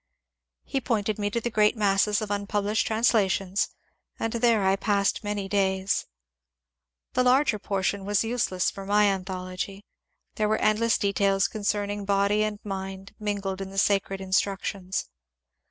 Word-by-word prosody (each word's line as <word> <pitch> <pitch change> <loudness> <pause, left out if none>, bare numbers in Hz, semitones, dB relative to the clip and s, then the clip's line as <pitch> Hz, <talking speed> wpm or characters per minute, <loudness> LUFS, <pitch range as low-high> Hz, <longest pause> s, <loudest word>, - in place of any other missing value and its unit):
He 270 - -2
pointed 215 -3 -1
me 205 0 0
to 235 - -1
the 235 +1 -3
great 215 +1 +3
masses 205 +1 +2
of 205 - -5
unpublished 205 +1 0
translations, 205 -4 +2 0.5
and 225 - -2
there 230 -3 +3
I 190 0 +4
passed 200 0 0
many 205 -1 -3
days. 190 -1 0 1.1
The 255 - +2
larger 255 -2 +3
portion 195 0 -1
was 205 +2 +1
useless 225 -6 0
for 195 - -8
my 210 +1 +4
anthology. 185 +1 -4 0.5
There 215 -1 +1
were 215 - +2
endless 220 +2 +2
details 200 -1 +2
concerning 205 -1 -2
body 200 +1 +2
and 215 -1 -1
mind 195 -1 -6
min 205 -1 -1
gled 195 0 -4
in 195 - -5
the 195 - -10
sacred 195 0 +1
instructions. 190 0 -1
205 Hz, 145 wpm, -26 LUFS, 195-215 Hz, 1.1 s, I